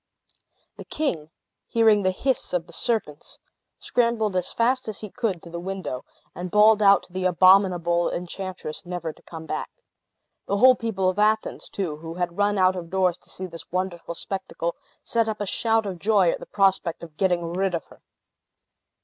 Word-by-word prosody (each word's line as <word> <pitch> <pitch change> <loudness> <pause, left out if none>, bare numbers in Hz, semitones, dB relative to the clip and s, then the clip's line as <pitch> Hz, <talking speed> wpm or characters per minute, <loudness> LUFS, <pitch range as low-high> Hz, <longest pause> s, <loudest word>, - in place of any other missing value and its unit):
The - - -8
king, 175 - -2 0.4
hearing 220 -3 +4
the 185 - +2
hiss 255 +6 -1
of 175 -2 0
the 170 - -16
serpents, 185 -11 -2 0.4
scrambled 230 -4 0
as 180 -1 0
fast 255 +2 +1
as 215 - -5
he 210 -3 -7
could 220 -9 -2
to 170 - -11
the 170 - -5
window, 185 -8 -5 0.3
and 180 +2 -5
bawled 210 +2 +5
out 200 -1 +6
to 180 - -17
the 185 0 -2
abominable 180 -2 +4
enchantress 180 -2 -5
never 175 -3 -5
to - - -22
come 160 -1 -9
back. - - -4 0.8
The 200 - 0
whole 255 +4 +8
people 220 -6 -1
of 185 +2 0
Athens, 215 +1 +1
too, 170 -7 -3
who 165 +1 -8
had 175 +1 -3
run 205 0 +2
out 185 0 +4
of 170 -2 -6
doors 185 -1 +1
to - - -19
see 185 - -6
this 165 -2 -10
wonderful 180 -2 -3
spectacle, 190 -2 -4 0.3
set 230 -1 +1
up 215 - -4
a 205 - -2
shout 225 +2 +1
of 185 -3 -5
joy 200 -4 +3
at - - -4
the - - -10
prospect 190 -4 +1
of 165 -2 -10
getting 175 -3 0
rid 190 0 0
of 165 - -4
her. - - -19
185 Hz, 185 wpm, -24 LUFS, 175-210 Hz, 0.8 s, whole